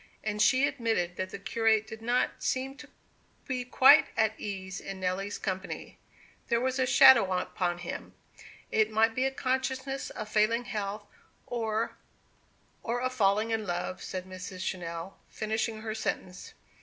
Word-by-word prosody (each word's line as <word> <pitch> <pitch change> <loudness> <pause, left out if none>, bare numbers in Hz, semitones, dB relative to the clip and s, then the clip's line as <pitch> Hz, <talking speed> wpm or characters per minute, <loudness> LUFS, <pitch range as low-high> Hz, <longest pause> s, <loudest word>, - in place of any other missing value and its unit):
And 210 -1 -1
she 260 +5 +5
admitted 220 -10 -1
that 185 0 -3
the - - -6
curate 220 +1 +2
did 220 0 -9
not 240 +2 0
seem 265 +1 -1
to 285 +1 -12 0.6
be 255 -2 -2
quite 260 +1 +7
at 220 -1 +3
ease 190 -1 -5
in 195 -1 -7
Nelly's 190 +2 -2
company. 190 0 -5 0.5
There 235 - +2
was 260 +2 -1
a 260 - +2
shadow 235 -7 +7
upon 180 -1 -1
him. 175 0 -7 0.6
It 220 -1 +3
might 220 +1 +3
be 255 +3 0
a 270 - +1
consciousness 265 +1 -2
of 215 - -6
failing 215 +3 +2
health, 205 -1 -4 0.4
or 225 -1 -2 0.8
"Or 235 +1 -2
of 255 +1 -1
failing 215 -1 +2
love," 175 -1 -3
said 185 -1 -5
Mr. 185 0 -8
Channell, 175 -1 -4
finishing 220 0 -2
her 220 -1 -3
sentence. 185 -4 -4
220 Hz, 150 wpm, -29 LUFS, 190-245 Hz, 0.8 s, quite